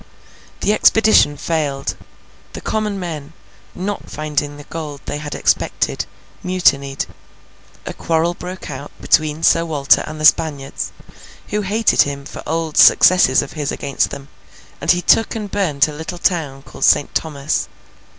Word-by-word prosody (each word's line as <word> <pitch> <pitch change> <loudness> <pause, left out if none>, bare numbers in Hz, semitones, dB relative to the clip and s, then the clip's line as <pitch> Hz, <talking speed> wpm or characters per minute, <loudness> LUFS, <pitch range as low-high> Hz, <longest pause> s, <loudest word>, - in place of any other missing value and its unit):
The 210 - +2
expedition 215 -9 +4
failed; 145 -3 -2 0.6
the - - -6
common 210 -2 -2
men, 160 -4 -6 0.4
not 200 +2 -5
finding 150 -1 -3
the 145 - -10
gold 150 -3 -7
they 145 - -4
had 150 -1 -6
expected, - - 0 0.3
mutinied; 140 -7 +1 0.8
a - - -5
quarrel 165 +1 0
broke 180 -1 -8
out 140 +1 -8
between 155 0 +1
Sir 165 - +4
Walter 145 -4 +2
and 155 0 -7
the 155 - 0
Spaniards, 145 -4 +1 0.6
who 210 0 -1
hated 210 +3 +2
him 140 -1 -2
for - - -8
old 160 -1 -2
successes 180 -8 +6
of - - -10
his 150 -3 -3
against 140 -2 -1
them; 140 0 -9 0.5
and - - -4
he 180 0 +4
took 225 - +3
and 210 -3 -5
burnt 155 -9 +1
a 150 - -7
little 160 +4 -6
town 155 -7 -1
called - - -9
Saint 145 - +3
Thomas. 150 -2 -2
155 Hz, 150 wpm, -18 LUFS, 145-180 Hz, 0.8 s, successes